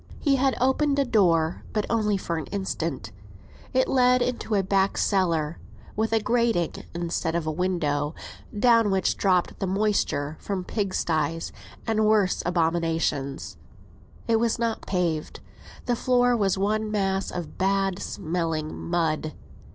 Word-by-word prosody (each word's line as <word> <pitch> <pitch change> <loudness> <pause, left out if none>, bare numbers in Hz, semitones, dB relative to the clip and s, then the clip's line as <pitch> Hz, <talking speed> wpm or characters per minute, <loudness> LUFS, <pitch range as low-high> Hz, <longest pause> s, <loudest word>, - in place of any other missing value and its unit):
He 280 -3 +2
had 265 0 +2
opened 275 +3 +2
a 280 - +3
door, 170 -8 +2
but 210 -1 0
only 210 -3 +1
for 170 -3 -3
an 155 - -5
instant; 165 - -3 0.6
it 260 0 +2
led 250 -1 +4
into 240 -3 -2
a 195 - +2
back 195 +1 +1
cellar, 170 -6 +1 0.4
with 220 +1 0
a 225 - +3
grating 230 -7 +1 0.2
instead 170 -1 -2
of 170 -2 -1
a 155 - 0
window, 155 -4 -1 0.4
down 230 -2 +5
which 190 -2 +1
dropped 185 -3 +1
the 195 - -1
moisture 185 -7 0
from 195 -3 -3
pigsties, 165 -6 -1 0.3
and 220 -1 +2
worse 210 -4 +3
abominations. 165 - -1 0.7
It 230 -1 +3
was 230 -1 +1
not 230 -1 -2
paved; 170 -5 -1 0.5
the 245 - +1
floor 245 0 +3
was 200 -4 +1
one 215 +2 0
mass 195 -2 0
of 170 -4 -6
bad 195 0 +1
smelling 160 -2 -2
mud. 160 -3 -1
190 Hz, 140 wpm, -25 LUFS, 165-220 Hz, 0.7 s, down